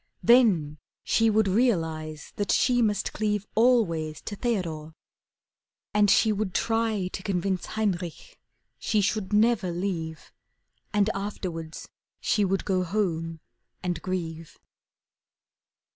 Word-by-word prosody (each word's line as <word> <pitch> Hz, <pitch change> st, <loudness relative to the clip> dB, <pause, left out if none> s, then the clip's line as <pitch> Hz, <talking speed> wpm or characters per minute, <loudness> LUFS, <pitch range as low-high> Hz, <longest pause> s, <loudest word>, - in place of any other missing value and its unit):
Then 190 Hz, -, +4 dB, 0.2 s
she 225 Hz, 0 st, +3 dB
would 215 Hz, -1 st, +3 dB
realize 160 Hz, -8 st, 0 dB
that 205 Hz, -, 0 dB
she 245 Hz, -1 st, +3 dB
must 210 Hz, -3 st, 0 dB
cleave 210 Hz, -2 st, -1 dB
Always 180 Hz, -11 st, +2 dB
to 205 Hz, -, -6 dB
Theodore. 165 Hz, -9 st, -3 dB, 1.0 s
And 210 Hz, -1 st, +4 dB
she 220 Hz, +2 st, +5 dB
would 205 Hz, -3 st, -2 dB
try 225 Hz, -4 st, 0 dB
To 190 Hz, -, -6 dB
convince 190 Hz, -1 st, -1 dB
Heinrich 200 Hz, -, -3 dB, 0.4 s
she 215 Hz, -, +1 dB
should 205 Hz, 0 st, 0 dB
never 210 Hz, -2 st, +3 dB
leave, 170 Hz, -3 st, -4 dB, 0.6 s
And 210 Hz, +1 st, +2 dB
afterwards 180 Hz, -5 st, -5 dB, 0.3 s
she 210 Hz, -, +1 dB
would 195 Hz, 0 st, 0 dB
go 185 Hz, -2 st, +1 dB
home 165 Hz, -4 st, -2 dB, 0.4 s
and 180 Hz, -1 st, -2 dB
grieve. 165 Hz, -3 st, -5 dB
195 Hz, 115 wpm, -26 LUFS, 165-215 Hz, 1.0 s, she